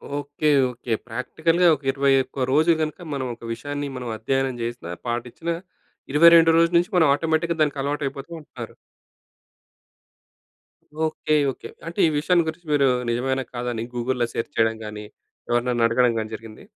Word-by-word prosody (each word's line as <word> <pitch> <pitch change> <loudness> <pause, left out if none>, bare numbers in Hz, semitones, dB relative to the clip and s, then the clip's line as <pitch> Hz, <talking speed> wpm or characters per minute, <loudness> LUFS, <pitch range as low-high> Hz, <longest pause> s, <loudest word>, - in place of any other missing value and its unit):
Okay, 145 +1 -3 0.2
okay. 120 -1 -4
ప్రాక్టికల్‌గా 160 +9 +1
ఒక, 140 - -15
21 135 -1 +1
రోజులు 160 +4 +4
గనక 155 +3 -3
మనం 135 -2 -2
ఒక - - -34
విషయాన్ని 145 +3 -5
మనం 125 -2 -5
అధ్యయనం 135 +3 -1
చేసినా, 120 -7 -5 0.2
పాటించిన 120 +8 -4 0.6
ఇరవై 170 +3 +8
రెండో 165 0 +6
రోజు 170 +1 +3
నుంచి 175 +5 +1
మనం 160 -4 +5
ఆటోమేటిక్‌గా 160 +2 0
దానికి 145 -2 +1
అలవాటైపోతూ 140 +1 -3
ఉంటారు. 150 - -10 2.3
ఓకె. 155 -1 -1 0.2
ఓకె. - - -10 0.2
అంటే 170 +4 -6
ఈ - - +2
విషయాన్ని 170 +2 +2
గురించి 160 +1 -6
మీరు 140 -2 +4 0.2
నిజమేనా, 130 +3 0
కాదా 125 0 -3
అని 115 0 -3
గూగుల్‌లో 120 0 -1
సెర్చ్ 115 - -4
చేయడం 115 0 +2
గాని, 105 0 -7 0.4
ఎవరినైనా 120 -1 +1
అడగడం 120 0 +3
గాని 110 0 -5
జరిగింది? 110 - -12
135 Hz, 145 wpm, -23 LUFS, 120-155 Hz, 2.3 s, ఇరవై